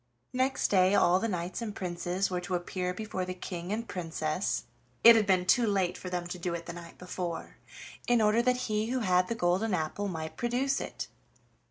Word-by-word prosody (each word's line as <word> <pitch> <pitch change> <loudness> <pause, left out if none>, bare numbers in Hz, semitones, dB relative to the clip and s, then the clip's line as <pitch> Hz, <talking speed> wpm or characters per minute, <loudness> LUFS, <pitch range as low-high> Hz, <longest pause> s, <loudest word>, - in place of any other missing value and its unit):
Next 260 +1 +1
day 190 0 +4
all 180 -2 +5
the 230 - 0
knights 180 0 -3
and 215 -3 -4
princes 180 +1 -2
were 180 -1 -1
to 180 +1 -2
appear 180 +1 -2
before 190 -1 -4
the 185 0 -4
King 180 0 -6
and 225 +2 -2
Princess 165 0 -2 0.4
it 235 0 +11
had 215 -2 +3
been 185 -2 +3
too 235 +5 +4
late 190 -3 +1
for 185 - -7
them 180 -1 -2
to 180 - -5
do 170 0 -2
it 170 0 -6
the 170 - -6
night 170 -1 -10
before 180 -1 -5 0.5
in 240 -1 +4
order 215 +1 +4
that 250 +1 +1
he 215 0 0
who 255 +1 -1
had 180 -3 +3
the 230 - -2
golden 185 +2 +1
apple 165 +5 -2
might 160 -4 -5
produce 255 +3 0
it. - - -5
185 Hz, 205 wpm, -30 LUFS, 175-220 Hz, 0.5 s, it